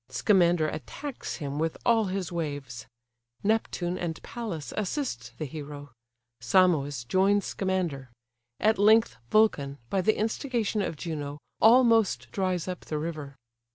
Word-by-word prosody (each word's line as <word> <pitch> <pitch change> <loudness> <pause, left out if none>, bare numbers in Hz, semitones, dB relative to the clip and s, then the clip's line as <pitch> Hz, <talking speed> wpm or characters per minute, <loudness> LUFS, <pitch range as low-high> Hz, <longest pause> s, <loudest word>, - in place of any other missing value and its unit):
Scamander 175 -6 +3
attacks 250 - -6
him 145 -2 -4
with 160 0 -1
all 225 -2 +4
his 190 -2 -3
waves: 145 -8 -5 0.6
Neptune 195 -4 0
and 165 -2 -3
Pallas 210 -11 -5
assist 180 - -3
the 155 - -3
hero: 145 -1 -8 0.5
Simois 145 -2 +3
joins 195 - +3
Scamander: 175 -9 -2 0.5
at 215 -1 +3
length 215 - +5
Vulcan, 145 -11 +2
by 195 - +2
the 215 +3 +2
instigation 225 -1 -1
of 165 - -2
Juno, 145 -3 -5 0.2
almost 230 -3 +5
dries 185 -3 -1
up 180 -1 -5
the 155 - -3
river. 150 -3 -5
175 Hz, 125 wpm, -28 LUFS, 145-210 Hz, 0.6 s, length